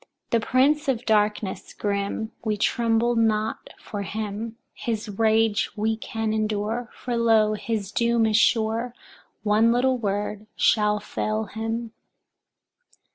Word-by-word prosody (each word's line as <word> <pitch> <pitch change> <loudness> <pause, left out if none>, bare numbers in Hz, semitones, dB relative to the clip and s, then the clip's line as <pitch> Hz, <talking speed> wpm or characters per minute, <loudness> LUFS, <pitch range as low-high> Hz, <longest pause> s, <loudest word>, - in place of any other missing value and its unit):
The 230 - +4
Prince 275 +6 +2
of 250 -2 0
Darkness 210 -2 0
grim, 200 +2 -2
we 215 -2 0
tremble 230 +2 +2
not 220 -1 0
for 205 - -6
him; 215 +3 -4 0.2
his 225 -2 -3
rage 220 0 +2
we 220 +1 0
can 225 0 -3
endure, 215 +2 -1
for 245 -1 -4
lo, 225 -2 +4
his 210 -2 -3
doom 235 0 +2
is 215 -1 +2
sure; 230 +2 +2 0.5
one 220 +2 +4
little 255 +1 +2
word 210 0 -2
shall 210 -1 +3
fell 215 +1 -2
him. 225 +2 -4
220 Hz, 125 wpm, -25 LUFS, 210-230 Hz, 0.5 s, The